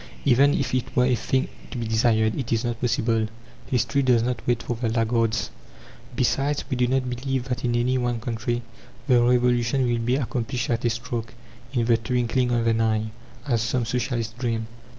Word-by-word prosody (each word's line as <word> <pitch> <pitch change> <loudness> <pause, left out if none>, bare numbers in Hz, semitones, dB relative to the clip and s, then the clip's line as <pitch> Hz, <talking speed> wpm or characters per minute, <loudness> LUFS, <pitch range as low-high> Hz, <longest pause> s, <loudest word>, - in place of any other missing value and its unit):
Even 140 +2 +5
if 130 -3 -1
it 130 -2 -2
were 125 - +4
a 125 - +3
thing 130 +3 0 0.2
to - - -6
be 120 - -2
desired, 110 -1 +2
it 130 - -4
is 115 0 +1
not 120 -1 -3
possible. 115 -2 +1 0.4
History 135 +2 +1
does 125 -3 +3
not 120 -2 -1
wait 120 -2 +1
for 120 - -2
the 115 0 -1
laggards. 115 0 0 0.6
Besides, 140 +3 +1
we - - +1
do 125 0 +2
not 130 0 0
believe 130 +1 -2
that 125 - -2
in 120 -1 +1
any 125 +2 +1
one 120 -1 -1
country 120 +1 -2 0.4
the 125 -3 +4
Revolution 125 +1 +2
will 120 -1 +1
be 120 +2 +1
accomplished 125 -2 -2
at 115 0 0
a - - +4
stroke, 115 0 -4 0.4
in 120 -4 0
the 115 -1 +4
twinkling 125 +2 0
of 120 -1 +1
an 115 0 +2
eye, 110 -1 0 0.3
as 120 -6 +1
some 120 +1 0
socialists 115 -1 -2
dream. 115 -3 -1
120 Hz, 190 wpm, -24 LUFS, 115-125 Hz, 0.6 s, Even